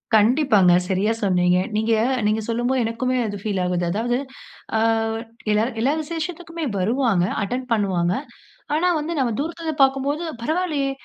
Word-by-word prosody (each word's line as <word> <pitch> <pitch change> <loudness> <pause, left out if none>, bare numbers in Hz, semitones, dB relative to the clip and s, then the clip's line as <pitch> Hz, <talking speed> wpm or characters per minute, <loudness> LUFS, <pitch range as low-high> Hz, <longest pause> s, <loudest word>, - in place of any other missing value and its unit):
கண்டிப்பாங்க, 215 - +4
சரியா 195 +4 +1
சொன்னீங்க. 180 -3 +3 0.2
நீங்க, 220 +1 +1 0.3
நீங்க 215 +1 +1
சொல்லும்போது 240 +2 0
எனக்குமே 250 +3 -1
அது 205 -1 -4
பீல் 205 -3 -1
ஆவுது. 180 -1 0
அதாவது 240 +5 0 0.6
ஆ - - +2 0.7
எல்லாரு 220 +4 +2
எல்லா 270 +5 +2
விசேஷத்துக்குமே 330 +1 -5
வருவாங்க. 220 -2 +2 0.2
அட்டெண்ட் 250 +5 -3
பண்ணுவாங்க. 185 -5 +1 0.6
ஆனா 345 +4 +2
வந்து 315 +3 -3
நம்ம 240 -4 +1
தூரத்துல 330 +3 -4
இருந்து 310 -2 -1
பார்க்கும்போது 275 +4 +1 0.2
"பரவாயில்லையே 305 -1 0
240 Hz, 135 wpm, -22 LUFS, 205-290 Hz, 0.7 s, கண்டிப்பாங்க